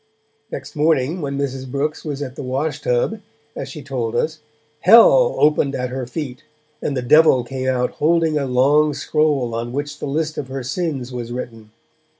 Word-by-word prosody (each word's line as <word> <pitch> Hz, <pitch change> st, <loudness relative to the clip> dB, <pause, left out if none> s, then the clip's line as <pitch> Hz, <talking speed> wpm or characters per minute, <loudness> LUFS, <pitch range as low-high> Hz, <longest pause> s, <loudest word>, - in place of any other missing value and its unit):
Next -, -, -7 dB
morning, 155 Hz, +2 st, +1 dB
when 140 Hz, -1 st, -3 dB
Mrs. 135 Hz, -2 st, -3 dB
Brooks 145 Hz, +3 st, -2 dB
was 145 Hz, -2 st, -4 dB
at 130 Hz, -2 st, -7 dB
the -, -, -6 dB
wash 140 Hz, +3 st, -2 dB
tub, 125 Hz, -, 0 dB, 0.4 s
as 135 Hz, -, -5 dB
she 145 Hz, +1 st, -8 dB
told 125 Hz, -4 st, -3 dB
us, 155 Hz, 0 st, -1 dB, 0.4 s
Hell 235 Hz, -, +6 dB
opened 150 Hz, -2 st, +2 dB
at 125 Hz, -1 st, -3 dB
her 130 Hz, -1 st, -4 dB
feet, 125 Hz, -2 st, -6 dB, 0.4 s
and 140 Hz, -, -2 dB
the 125 Hz, -, -2 dB
Devil 150 Hz, -1 st, +5 dB
came 130 Hz, +2 st, -4 dB
out 125 Hz, -1 st, +1 dB
holding 160 Hz, 0 st, +1 dB
a 140 Hz, -2 st, 0 dB
long 145 Hz, +4 st, +3 dB
scroll 140 Hz, -4 st, 0 dB
on 115 Hz, +1 st, -3 dB
which 145 Hz, +2 st, -4 dB
the -, -, -4 dB
list 155 Hz, +2 st, -2 dB
of 140 Hz, -, -5 dB
her 135 Hz, 0 st, -5 dB
sins 130 Hz, -2 st, -3 dB
was 120 Hz, -1 st, -5 dB
written. 115 Hz, -3 st, -7 dB
140 Hz, 180 wpm, -20 LUFS, 125-155 Hz, 0.4 s, Hell